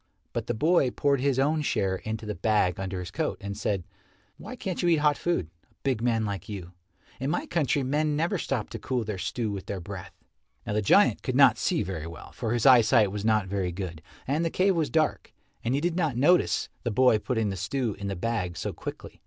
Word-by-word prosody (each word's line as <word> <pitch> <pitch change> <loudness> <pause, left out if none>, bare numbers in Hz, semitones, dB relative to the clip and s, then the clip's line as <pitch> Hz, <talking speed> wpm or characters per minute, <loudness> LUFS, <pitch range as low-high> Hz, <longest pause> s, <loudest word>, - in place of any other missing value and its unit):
But - - -3
the - - -1
boy 155 +1 +3
poured 140 +1 +1
his 140 -1 +1
own 150 +3 +2
share 95 -9 0
into 110 +2 -5
the 105 - -3
bag 95 -2 +1
under 95 -1 -3
his 90 - -7
coat, - - -2
and 100 0 -5
said, 100 -3 -1 0.5
"Why 230 +6 -8
can't 190 -7 -3
you 175 - +2
eat 170 - +5
hot 150 -1 +5
food 130 - -1 0.2
a - - -34
big 130 -5 0
man 115 -2 +1
like 100 -2 -5
you? 95 -4 -6 0.5
In 135 +2 -2
my - - -1
country 150 -3 0
men 150 +3 +1
never 170 +5 0
stop 125 -8 -2
to - - -5
cool 125 -3 -1
their 105 -3 -4
stew 110 +2 -2
with 100 -2 -6
their 100 - -3
breath." 90 0 -8 0.5
Now - - -2
the 105 - +1
giant 100 - +4
could - - -2
not - - +6
see - - +1
very 80 -4 -5
well, 85 - -10
for 115 -3 -3
his 120 -2 0
eyesight 115 -5 +6
was 105 0 -4
not 110 -2 +2
very 95 -2 -1
good, 85 -3 -6 0.2
and 150 +5 0
the 165 - +1
cave 190 +3 +2
was 160 -4 0
dark, 155 +4 0 0.3
and 120 +3 +1
he - - +1
did 170 0 0
not 160 -9 0
notice 175 +8 +3
the 120 - -2
boy 115 0 +4
putting 110 -2 -1
the 95 - -3
stew 110 +4 -2
in 100 - -4
the 100 - -2
bag 90 -3 -2
so - - -3
quickly. - - -8
115 Hz, 230 wpm, -27 LUFS, 100-140 Hz, 0.5 s, not